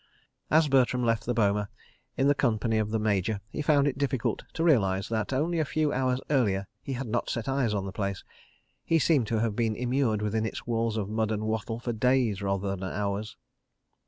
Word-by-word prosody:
As 160 0 +4
Bertram 125 -2 +3
left 115 -1 0
the 120 - +1
boma 105 -2 +1 0.5
in 140 +2 +4
company 115 -5 +1
of 105 -1 -1
the 110 - 0
Major, 105 -1 0
he - - -3
found 145 -1 +3
it 140 -1 -2
difficult 130 -4 -1
to 165 - -1
realise 100 - +3
that, 110 +1 -1
only 160 +6 0
a - - +3
few 155 0 0
hours 130 0 +1
earlier 100 -8 +2 0.2
he 135 - -5
had 135 +1 -3
not 120 +1 -2
set 115 - -3
eyes 135 -4 +1
on 100 -1 -2
the 95 - -5
place. 100 -1 -3 0.6
He 165 - +2
seemed 145 -7 +3
to 110 0 0
have 115 -3 0
been 115 -2 0
immured 120 -3 0
within 110 +1 0
its 110 - -4
walls 115 -1 0
of 100 -3 -2
mud 110 +1 -1
and 110 0 -2
wattle 110 +1 -2
for 120 0 -3
days, 115 -3 +2
rather 100 0 -1
than 95 - -10
hours. 100 +2 -3
115 Hz, 205 wpm, -28 LUFS, 105-135 Hz, 0.6 s, As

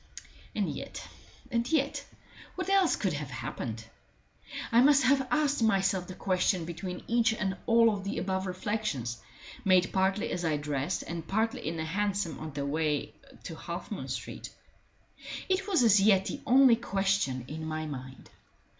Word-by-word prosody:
And - - +1
yet - - -6 0.4
and 235 +3 0
yet 285 -3 +1 0.5
what 370 +1 -3
else 390 -3 +4
could 190 -5 -1
have 145 -2 -4
happened? 120 -3 -5 0.9
I 235 - +6
must 280 0 +6
have 265 +1 +3
asked 295 -4 +1
myself 195 -4 +2
the 185 - -8
question 185 -2 +1
between 175 +2 -6
each 230 -1 +2
and 190 -3 -1
all 230 -1 +5
of 200 -2 -4
the 200 - -3
above 190 0 -1
reflections, 185 - -3 0.4
made 185 -3 +3
partly 190 +1 +1
as 175 - -2
I 155 -3 +1
dressed 145 -1 -2
and 165 -1 -6
partly 220 -3 -1
in 165 +1 -2
the 160 - -2
hansom 200 +1 -1
on 155 0 -6
the 140 0 -3
way 150 0 -1 0.3
to - - -6
Half - - -6
moon - - -4
Street. - - -6 1.0
It 380 +1 0
was 360 -10 +3
as 215 -3 +6
yet 195 -2 +5
the 285 - -4
only 255 -2 +7
question 195 - 0
in 160 +2 -6
my 155 0 -3
mind. 130 -3 -8
190 Hz, 165 wpm, -30 LUFS, 160-230 Hz, 1.0 s, only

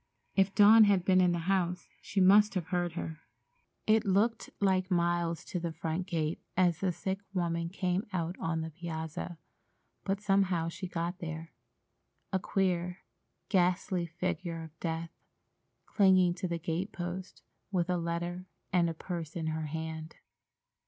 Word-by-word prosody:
If 195 0 +3
Dawn 215 +1 +8
had 195 -3 +3
been 185 -1 +5
in 180 -1 +4
the 175 - 0
house, 180 -2 0
she 200 - -2
must 200 +2 +6
have 180 -1 -2
heard 175 -2 0
her. 160 -2 -5 0.7
It 220 0 +4
looked 210 +3 +1
like 190 -2 +2
miles 170 -2 +1
to 180 - -3
the 170 -1 -3
front 160 +3 -3
gate 160 -2 -1 0.2
as 175 -3 +3
the 190 -2 +1
sick 190 +3 -3 0.2
woman 170 -2 0
came 185 +1 -1
out 175 -1 -2
on 165 0 -1
the 160 0 -5
piazza, 160 0 -5 0.7
but 195 0 -1
somehow 195 -5 +2
she 185 +3 -6
got 175 +1 -3
there—a 165 +3 -8
queer, 180 -1 -1 0.5
ghastly 180 -1 +2
figure 170 0 -3
of 160 0 -13
death, 165 0 -3 0.7
clinging 185 -3 +4
to 185 +1 -3
the 170 -1 -2
gate 170 +4 -2
post, 180 +1 -6 0.3
with 175 -3 +1
a 180 -1 +1
letter 175 +2 -3 0.3
and 175 -2 +4
a 165 - -4
purse 165 -2 -5
in 165 -2 -3
her 160 -1 -3
hand. 160 +1 -5
175 Hz, 150 wpm, -31 LUFS, 165-190 Hz, 0.7 s, Dawn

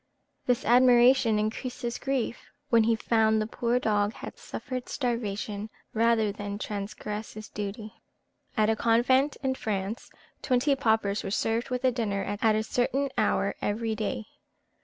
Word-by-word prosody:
This 245 -2 +1
admiration 245 -1 +5
increased 225 +4 -3
his 240 0 -2
grief, 270 -4 -2 0.2
when 230 -2 +5
he 230 0 +3
found 220 -1 +2
the 215 - 0
poor 235 +2 0
dog 210 -3 +1
had - - -8
suffered 255 -1 -6
starvation 215 -4 -3 0.2
rather 225 -2 +3
than 205 0 -5
transgress 210 +1 -5
his 215 0 -9
duty. 210 +1 -6 0.6
At 215 -1 +4
a - - +1
convent 250 +6 +3
in 265 -1 +1
France, 215 -3 -3 0.3
twenty 270 +2 +2
paupers 220 -6 +1
were - - -3
served 225 +5 0
with 250 0 -2
a 255 - +5
dinner 210 -5 -1
at 210 +2 +1
a 215 - +1
certain 265 +5 0
hour - - +1
every 220 +2 -1
day. 220 +2 -3
225 Hz, 150 wpm, -28 LUFS, 210-245 Hz, 0.6 s, admiration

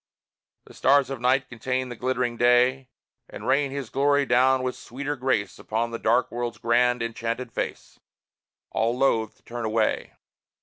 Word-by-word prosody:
The - - -15
stars 140 0 +3
of 135 -3 -5
Night 130 +1 +2
contain 125 +2 -3
the 120 - -6
glittering 125 0 -1
Day 125 +2 +3 0.4
And - - -9
rain 140 +2 +2
his 135 -3 -6
glory 145 +1 +2
down 130 +1 +3
with 130 0 -2
sweeter 140 +4 -5
grace 130 -6 -1
Upon 115 +2 -2
the 115 - -4
dark 120 +3 +2
World's 120 -1 -3
grand, 120 +1 +2
enchanted 115 +1 -4
face - - -5 0.7
All 115 +2 0
loth 115 -5 +1
to - - -32
turn 120 0 -6
away. 110 0 0
125 Hz, 160 wpm, -25 LUFS, 115-130 Hz, 0.7 s, stars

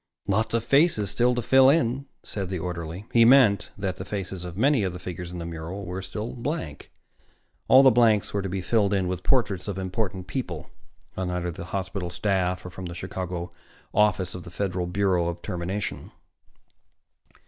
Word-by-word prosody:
"Lot 110 +3 +1
of 115 - +1
faces 135 - +3
still 125 +1 +2
to 120 - -1
fill 130 +2 +6
in," 140 -2 +1 0.2
said 95 -3 -4
the 95 - -2
orderly. 85 +2 -5
He 115 - +7
meant 115 -4 +6
that 95 -2 -3
the - - -5
faces 95 -2 -5
of 90 0 -7
many 135 +2 +3
of 95 -3 -1
the - - -6
figures 90 -1 -6
in 90 - -6
the 85 - -5
mural 85 +4 -6
were 90 +2 -4
still 105 +4 -5
blank. 120 - -5 0.8
All 130 +1 +8
blanks 110 -3 +3
were 100 - 0
to 95 - -4
be 95 +1 -2
filled 105 0 +2
with 90 0 -3
portraits 100 -6 +1
of 100 -2 -3
important 95 -1 -3
people 90 - -5 0.4
on 95 -1 -2
either 90 -1 -2
the 85 - -7
hospital 95 -1 -3
staff 90 0 0
or 90 - -7
from 95 -1 -7
the 85 - -7
Chicago 90 -1 -5 0.4
Office 105 -4 +2
of 90 - -7
the 85 - -9
Federal 90 0 -2
Bureau 90 -2 +1
of 85 0 -5
Termination. 95 +3 -4
95 Hz, 180 wpm, -26 LUFS, 90-110 Hz, 0.8 s, All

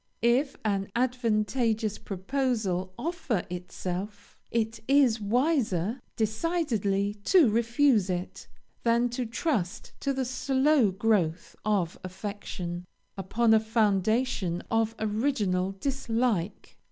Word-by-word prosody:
If 255 +4 +3
an 195 -2 0
advantageous 225 -3 0
proposal 195 -3 -1
offer 310 - -2
itself, 180 +3 -5
it 225 -1 -1
is 265 -5 +4
wiser 235 - +1
decidedly 220 - 0
to 355 -8 +6
refuse 235 -2 +3
it, 180 0 -4 0.3
than 235 +1 +2
to 245 0 -3
trust 230 - -2
to 275 - -1
the 265 -1 -1
slow 265 0 +2
growth 190 -4 0
of 195 -5 0
affection, 185 -2 -6 0.3
upon 220 +4 +2
a 220 - +6
foundation 215 -3 +1
of 225 0 +1
original 210 -4 0
dislike. 235 -7 -1
220 Hz, 100 wpm, -28 LUFS, 195-255 Hz, 0.3 s, to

